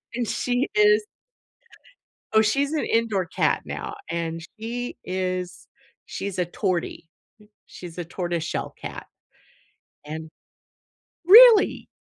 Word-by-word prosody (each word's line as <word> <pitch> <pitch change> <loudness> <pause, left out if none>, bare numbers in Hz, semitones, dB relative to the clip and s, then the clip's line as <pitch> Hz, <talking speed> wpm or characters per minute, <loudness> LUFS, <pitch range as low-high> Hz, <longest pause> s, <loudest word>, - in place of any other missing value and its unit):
and 240 -3 -2
she 245 +2 -1
is 420 0 +4 1.3
Oh, 220 - +7
she's 275 +7 +1
an 310 - -1
indoor 220 -5 0
cat - - 0
now, - - -6 0.2
and 165 -1 -3 0.2
she 240 +2 -5
is 185 -1 -4 0.4
she's 195 -2 -5
a 180 - +1
tortie, 180 -3 -3 0.4
m 210 - -20 0.2
she's 175 -1 -11
a 175 - -4
tortoiseshell 175 -1 -4
cat, - - -7 1.0
and 160 +1 -7 1.0
Really? 445 +3 +7
200 Hz, 110 wpm, -24 LUFS, 175-245 Hz, 1.3 s, Oh